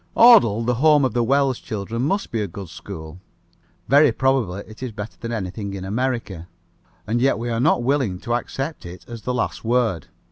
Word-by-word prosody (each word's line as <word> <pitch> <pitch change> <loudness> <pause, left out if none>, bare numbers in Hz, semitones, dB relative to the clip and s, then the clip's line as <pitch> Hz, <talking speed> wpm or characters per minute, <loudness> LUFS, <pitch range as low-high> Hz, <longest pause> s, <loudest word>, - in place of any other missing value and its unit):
Audle, 120 - +7
the 125 - +2
home 150 -3 +5
of 125 - -1
the 120 -1 +1
Wells 135 +1 +2
children, 110 +2 -4
must 195 +10 -1
be 115 - -1
a 105 - -2
good 95 0 -9
school. 85 -1 -9 0.7
Very 145 0 +6
probably 115 -7 0
it 110 +2 -14
is 130 -2 -4
better 105 0 -7
than 115 -1 -5
anything 100 -2 -4
in 95 -1 -6
America. 110 -5 -3 0.6
And 120 +2 -1
yet 135 -4 +3
we 120 +1 -3
are 115 - -1
not 125 -2 +2
willing 130 -8 0
to 120 - -2
accept 135 +5 -3
it 90 0 -10
as 115 -2 -8
the 125 - -2
last 125 - -2
word. 115 - 0
115 Hz, 200 wpm, -22 LUFS, 100-130 Hz, 0.7 s, Audle